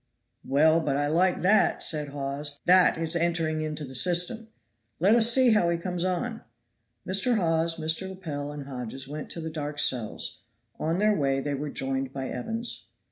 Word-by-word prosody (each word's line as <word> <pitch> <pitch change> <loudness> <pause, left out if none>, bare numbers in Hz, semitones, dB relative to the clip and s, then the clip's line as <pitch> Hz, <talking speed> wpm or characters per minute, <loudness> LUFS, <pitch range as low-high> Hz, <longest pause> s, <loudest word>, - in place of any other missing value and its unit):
"Well, 155 +4 +4
but 140 -4 -1
I 145 - +1
like 175 +5 +2
that!" 210 +4 +3
said 150 -2 -1
Hawes. 140 +1 -4
"That 180 -1 +5
is 165 0 -3
entering 165 -2 0
into 155 -1 -4
the 130 - -10
system. 180 - +1 0.5
Let 195 +6 +4
us 235 0 +5
see 255 0 +5
how 210 -6 +3
he 170 - +1
comes 175 0 -3
on." 205 +6 -2 0.6
Mr. 200 +6 +2
Hawes, 165 -3 +1
Mr. 165 +4 -2
Lepel 150 -7 -5
and 145 -1 -7
Hodges 130 -1 -7
went 150 +1 -7
to - - -6
the 160 0 -5
dark 150 -1 -5
cells; 125 -6 0 0.4
on 165 +2 0
their 210 +1 +3
way 135 -4 +1
they 145 +1 -3
were 145 +2 -3
joined 135 -1 -2
by 135 -1 -5
Evans. 225 - -3
160 Hz, 180 wpm, -27 LUFS, 145-185 Hz, 0.6 s, That